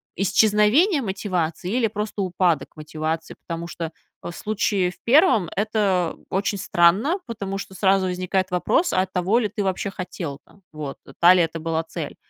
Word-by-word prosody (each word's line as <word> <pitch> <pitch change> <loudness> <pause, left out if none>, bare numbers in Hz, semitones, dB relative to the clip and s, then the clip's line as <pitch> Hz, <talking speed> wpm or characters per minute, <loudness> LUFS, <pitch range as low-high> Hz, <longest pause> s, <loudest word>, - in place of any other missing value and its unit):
исчезновение 215 - +3
мотивации 185 -5 -2
или 235 0 +2
просто 210 -1 -4
упадок 175 -5 +1
мотивации? 155 +1 -4
Потому 170 0 -5
что 165 -1 -5 0.3
в - - -6
случае 200 -1 0
в 180 - -19
1 250 - +4
это 200 -4 0
очень 200 +2 -1
странно, 195 - +3
потому 200 -4 -5
что 195 - -8
сразу 190 -1 +3
возникает 185 +1 -1
вопрос: 255 - +1
а 185 - +2
того 190 +5 +1
ли 215 -4 -1
ты 205 0 -3
вообще 190 +1 -1
хотел 175 -6 -6
там, 200 - -23
вот, 150 -3 -6 0.2
та 175 +1 +8
ли 185 - +4
это 165 0 -3
была 165 0 -1
цель? 160 -2 -6
190 Hz, 160 wpm, -23 LUFS, 170-210 Hz, 0.3 s, та